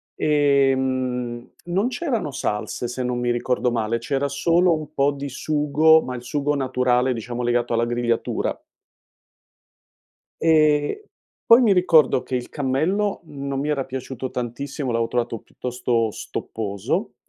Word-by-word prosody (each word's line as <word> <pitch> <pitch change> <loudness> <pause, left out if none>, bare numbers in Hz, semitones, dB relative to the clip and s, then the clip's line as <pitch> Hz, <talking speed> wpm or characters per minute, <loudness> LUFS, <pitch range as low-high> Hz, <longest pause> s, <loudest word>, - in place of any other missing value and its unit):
ehm, 130 -4 +1 0.2
non 190 +7 0
c'erano 245 - -2
salse, 105 +1 -3
se 125 +1 -4
non 125 0 -1
mi 120 0 0
ricordo 125 +1 0
male, 115 0 0
c'era 140 +3 -1
solo 170 +5 +2
un 155 0 -9
po' 140 0 +2
di 140 0 -6
sugo, 155 +3 +3
ma 125 - -5
il 120 - -6
sugo 145 +3 -1
naturale, 125 -1 +1
diciamo, 120 +1 -5
legato 120 0 0
alla 115 0 +2
grigliatura. 120 -1 -1 1.8
Ehm, 155 -2 +3 0.5
poi 230 +2 +8
mi 215 -4 +5
ricordo 165 -7 +4
che 130 - -3
il 125 - -4
cammello 160 +10 -1
non 140 -3 -5
mi 145 +2 -2
era 140 -3 0
piaciuto 130 -1 -6
tantissimo, 130 +3 -4
l'avevo 115 -1 0
trovato 120 -1 -1
piuttosto 120 -1 -2
stopposo. 100 -3 -4
130 Hz, 135 wpm, -22 LUFS, 120-150 Hz, 1.8 s, poi